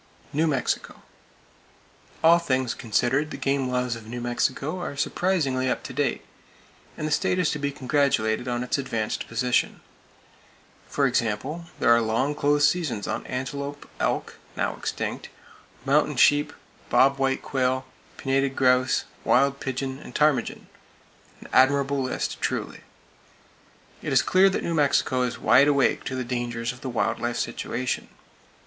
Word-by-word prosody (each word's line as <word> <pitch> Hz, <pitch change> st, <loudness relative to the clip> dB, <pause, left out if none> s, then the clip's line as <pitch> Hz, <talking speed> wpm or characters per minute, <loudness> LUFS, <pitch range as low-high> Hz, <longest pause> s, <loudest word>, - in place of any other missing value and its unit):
New 155 Hz, +3 st, +2 dB
Mexico: 140 Hz, -5 st, -2 dB, 1.2 s
All 170 Hz, +1 st, +7 dB
things 130 Hz, -6 st, 0 dB
considered, 125 Hz, +6 st, 0 dB
the -, -, -6 dB
game 135 Hz, -1 st, 0 dB
laws 125 Hz, -1 st, -1 dB
of 110 Hz, -2 st, -11 dB
New 120 Hz, +2 st, -5 dB
Mexico 130 Hz, +7 st, -1 dB
are 145 Hz, -5 st, -5 dB
surprisingly 140 Hz, -6 st, 0 dB
up -, -, -2 dB
to -, -, -7 dB
date, 140 Hz, -2 st, -1 dB, 0.7 s
and 155 Hz, -, -2 dB
the -, -, -4 dB
state 150 Hz, +4 st, +1 dB
is 180 Hz, -4 st, +2 dB
to 150 Hz, -, -3 dB
be 140 Hz, 0 st, -1 dB
congratulated 130 Hz, -5 st, 0 dB
on 120 Hz, 0 st, -1 dB
its 125 Hz, -, -1 dB
advanced 115 Hz, -5 st, -3 dB
position. 125 Hz, +1 st, 0 dB, 1.1 s
For -, -, +1 dB
example, 130 Hz, +10 st, -1 dB
there -, -, +4 dB
are 115 Hz, 0 st, +6 dB
long 115 Hz, +6 st, 0 dB
close 145 Hz, 0 st, +3 dB
seasons 145 Hz, -, -1 dB
on -, -, -4 dB
antelope, 140 Hz, +3 st, -5 dB
elk -, -, -2 dB, 0.2 s
(now -, -, -1 dB
extinct!), -, -, -4 dB, 0.6 s
mountain -, -, +2 dB
sheep, 145 Hz, 0 st, +4 dB, 0.4 s
bob 135 Hz, +1 st, +4 dB
white 135 Hz, 0 st, 0 dB
quail, 130 Hz, -1 st, 0 dB, 0.3 s
pinnated 135 Hz, 0 st, 0 dB
grouse, 125 Hz, 0 st, +3 dB, 0.2 s
wild 140 Hz, +2 st, +3 dB
pigeon 130 Hz, 0 st, -4 dB
and -, -, -12 dB
ptarmigan,—an 150 Hz, -2 st, -3 dB
admirable 140 Hz, +1 st, +3 dB
list, 130 Hz, -, -3 dB
truly. -, -, -3 dB, 1.2 s
It -, -, -4 dB
is -, -, +4 dB
clear 190 Hz, +1 st, +5 dB
that 190 Hz, -, -2 dB
New 170 Hz, -, -1 dB
Mexico 140 Hz, -4 st, +2 dB
is 125 Hz, -1 st, -1 dB
wide 130 Hz, +6 st, +5 dB
awake 140 Hz, -3 st, +2 dB
to 130 Hz, -, -3 dB
the 130 Hz, -, -2 dB
dangers 120 Hz, -1 st, -3 dB
of 125 Hz, -, -15 dB
the 130 Hz, -, -4 dB
wild 120 Hz, -, -1 dB
life 120 Hz, 0 st, -2 dB
situation. 125 Hz, +1 st, -3 dB
135 Hz, 145 wpm, -25 LUFS, 125-145 Hz, 1.2 s, All